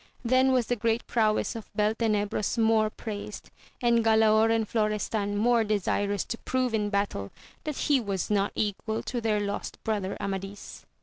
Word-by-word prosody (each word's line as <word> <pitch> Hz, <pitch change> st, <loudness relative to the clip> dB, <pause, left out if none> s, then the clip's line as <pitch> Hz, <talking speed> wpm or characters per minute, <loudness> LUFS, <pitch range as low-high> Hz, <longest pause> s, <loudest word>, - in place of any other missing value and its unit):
Then 255 Hz, +2 st, +4 dB
was 250 Hz, -2 st, +2 dB
the 245 Hz, -, 0 dB
great 230 Hz, +1 st, 0 dB
prowess 215 Hz, -2 st, +1 dB
of 225 Hz, -, -8 dB
Beltenebros 210 Hz, -1 st, 0 dB
more 220 Hz, -1 st, +3 dB
praised, 210 Hz, -1 st, -7 dB, 0.3 s
and 235 Hz, -1 st, +4 dB
Galaor 220 Hz, 0 st, +4 dB
and 225 Hz, -1 st, +1 dB
Florestan 210 Hz, -1 st, -1 dB
more 235 Hz, +2 st, +3 dB
desirous 205 Hz, -1 st, 0 dB
to 230 Hz, -, -5 dB
prove 255 Hz, -2 st, -1 dB
in 210 Hz, -2 st, 0 dB
battle 200 Hz, -, -2 dB, 0.3 s
that 305 Hz, -3 st, -3 dB
he 290 Hz, -3 st, +2 dB
was 200 Hz, -2 st, -3 dB
not 200 Hz, -1 st, +2 dB
equal 220 Hz, +1 st, -2 dB
to 245 Hz, -2 st, -3 dB
their 215 Hz, -2 st, +1 dB
lost 200 Hz, 0 st, -4 dB
brother 205 Hz, -3 st, -2 dB
Amadis. 195 Hz, +1 st, -6 dB
215 Hz, 160 wpm, -27 LUFS, 205-230 Hz, 0.3 s, Then